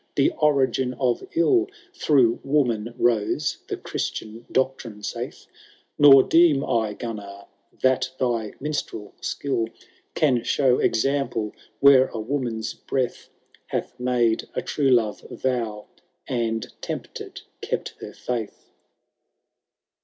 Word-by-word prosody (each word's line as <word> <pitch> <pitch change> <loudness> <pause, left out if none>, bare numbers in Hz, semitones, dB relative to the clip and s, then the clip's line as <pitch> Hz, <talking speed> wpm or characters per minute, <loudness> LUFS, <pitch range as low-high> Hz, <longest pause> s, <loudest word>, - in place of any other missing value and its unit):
e 140 - +4
origiii 135 -4 +1
of 125 -3 +1
ill 355 - +4 0.3
Through 135 - +3
woman 120 -5 0
rote, 115 -4 +1
the - - -3
Chiutian 110 +2 -5
doctrine 130 -5 -1
eaith; - - -5 0.5
Nor 135 -2 +9
deem 165 -4 +4
I 110 -4 0
Gimnar, 100 -4 -7 0.4
that 130 0 +3
thy 115 -4 -1
miniBtrel 140 -7 -4
skill 135 -5 -1
^ - - -20 0.4
Can 130 -6 +2
show 130 -1 +2
example 115 -3 0 0.3
where 135 -2 +7
a - - -16
woman^ 115 -1 -3
breath 130 -2 -2 0.4
Hath - - -4
made 120 -2 +1
a - - -1
true 140 -3 +1
love 115 -4 +2 0.2
tow, 115 -5 -1 0.4
and, 115 -3 -2
tempted, - - -6 0.2
kept - - -3
her - - -8
faith." 120 -4 -5
125 Hz, 115 wpm, -24 LUFS, 115-135 Hz, 0.5 s, Nor